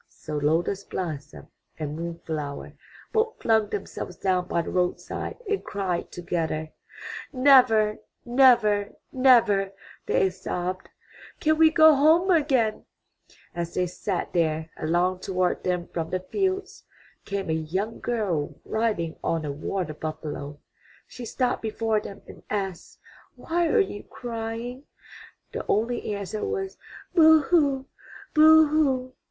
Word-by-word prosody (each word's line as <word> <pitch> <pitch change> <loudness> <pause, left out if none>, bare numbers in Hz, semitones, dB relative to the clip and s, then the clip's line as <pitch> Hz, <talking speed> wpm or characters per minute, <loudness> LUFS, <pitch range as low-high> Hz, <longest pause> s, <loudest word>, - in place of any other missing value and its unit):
So 155 -2 -8
Lotus 165 +7 0
blossom 155 -8 -6 0.3
and 150 -1 -4
Moon 170 +1 -5
flower 150 -3 -5 0.4
both 445 0 +1
flung 220 -2 +2
themselves 195 -2 -5
down 185 -2 0
by 170 - 0
the - - -6
roadside 180 -1 -2
and 415 0 -1
cried 185 -4 -3
together. 160 -3 -3 0.6
''Never, 255 -6 +5 0.3
never, 240 -5 +4 0.2
never,'' 230 -7 +4 0.3
they 190 - +2
sobbed, 185 0 -4 0.5
''can 310 0 +3
we 320 -1 +7
go 315 -1 +7
home 320 +6 +4
again/' 270 -10 +2 0.7
As 170 -1 -4
they 180 - +1
sat 180 +1 -4
there, 160 -1 0
along 175 +3 0
toward 185 -1 -1
them 180 -1 -1
from 165 -1 -4
the 185 - -1
fields 385 -1 -1 0.4
came 195 -4 -3
a - - +2
young 180 +8 -3
girl 200 -11 -2
riding 215 -8 -1
on 165 -2 -1
a 145 - -2
water 155 +3 -3
buffalo. 150 -2 -6 0.5
She 245 - -9
stopped 250 +2 -1
before 220 0 0
them 200 -1 -10
and - - -12
asked, 195 -4 -4 0.4
"Why 340 +1 0
are 455 - +3
you 390 - -1
crying?" 235 +2 -6 0.7
The - - -4
only 225 0 0
answer 200 +1 -5
was, 390 -2 -3 0.4
"Boo 320 -2 +7
hoo! 280 -4 +2 0.5
Boo 315 0 +8
hoo! 265 -4 +1
205 Hz, 130 wpm, -25 LUFS, 175-260 Hz, 0.7 s, Boo